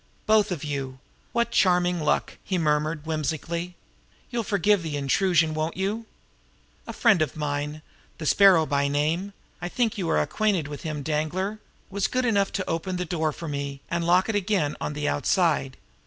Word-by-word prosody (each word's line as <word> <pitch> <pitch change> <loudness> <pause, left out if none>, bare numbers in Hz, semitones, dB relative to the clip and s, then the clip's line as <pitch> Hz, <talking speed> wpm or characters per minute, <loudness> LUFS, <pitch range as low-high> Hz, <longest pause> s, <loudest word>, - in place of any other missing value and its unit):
"Both 215 -2 +4
of 165 -5 -3
you! 135 -3 -4 0.3
What 235 0 0
charming 180 -3 +3
luck!" 150 - 0
he 190 - -1
murmured 150 -1 0
whimsically. 160 +3 -3 0.6
"You'll 240 -1 0
forgive 205 -1 +2
the 155 -3 -3
intrusion 160 +3 +2
won't 155 +2 -2
you? 210 +4 -2 0.8
A - - -4
friend 220 - +4
of 155 -5 0
mine, 150 0 -3 0.3
the 160 - -6
Sparrow 185 -1 +6
by 140 -1 +1
name 160 +8 0 0.3
I 175 - -3
think 230 +1 0
you 175 - -1
are - - +3
acquainted 185 - 0
with 145 -1 -7
him, 155 -4 -4
Danglar 165 +8 -1 0.3
was 200 0 0
good 255 0 0
enough 200 -4 +2
to 185 - -2
open 165 +3 -2
the 180 0 -2
door 160 -2 -1
for 165 +3 -8
me, 140 -1 -4
and 170 0 0
lock 180 +2 +3
it 220 - -1
again 195 -7 0
on - - -2
the 150 0 -2
outside. 145 -3 +1
165 Hz, 175 wpm, -25 LUFS, 150-195 Hz, 0.8 s, Sparrow